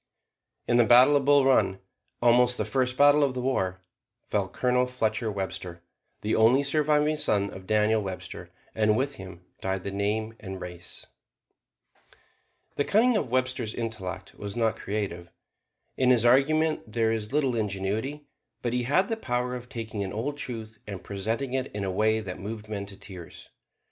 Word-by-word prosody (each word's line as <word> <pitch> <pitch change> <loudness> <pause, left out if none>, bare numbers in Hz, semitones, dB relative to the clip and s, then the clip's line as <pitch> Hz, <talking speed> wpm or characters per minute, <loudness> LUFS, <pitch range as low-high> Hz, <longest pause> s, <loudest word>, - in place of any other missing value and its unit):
In 120 - +3
the 120 - +7
battle 125 +5 +7
of 140 -2 +2
Bull 145 -1 +5
Run, 130 -7 +3 0.5
almost 125 +1 +4
the - - -1
first 130 -1 0
battle 145 +1 +6
of 135 -2 0
the 125 - -2
war, 95 -8 -1 0.5
fell - - 0
Colonel 125 0 +1
Fletcher 110 -2 -1
Webster, 90 -3 -5 0.4
the 105 - -1
only 120 +5 +5
surviving 150 +1 +2
son 100 -8 +1
of 95 0 -11
Daniel 110 +1 +3
Webster, 95 -2 -6 0.2
and 105 0 +2
with 135 +1 -1
him 90 -1 -10 0.2
died 95 -1 -2
the 100 - -4
name 105 +3 -1
and 95 -2 -7
race. 90 -1 -8 1.7
The 145 - +2
cunning 230 - +3
of 150 - 0
Webster's 130 -3 -1
intellect 110 -6 -5
was 100 -1 -7
not 115 -2 +1
creative. 95 -4 -4 0.7
In 130 -1 +3
his 120 -2 +4
argument 155 +1 +3
there 115 0 +1
is 110 -1 -3
little 135 -4 +1
ingenuity; 110 +7 -2 0.4
but 120 -1 -1
he 125 - +1
had 185 +10 +3
the 225 - -1
power 125 - -2
of 125 0 -8
taking 110 -5 -4
an 95 - -4
old 135 +7 -3
truth 110 -6 -6
and 100 -3 -7
presenting 110 +7 -3
it 130 0 0
in 100 - -2
a 95 - -1
way 110 +3 +2
that 90 -3 -7
moved 110 +1 -6
men 100 -2 -4
to 100 -1 -11
tears. 95 -4 -10
115 Hz, 170 wpm, -27 LUFS, 100-130 Hz, 1.7 s, the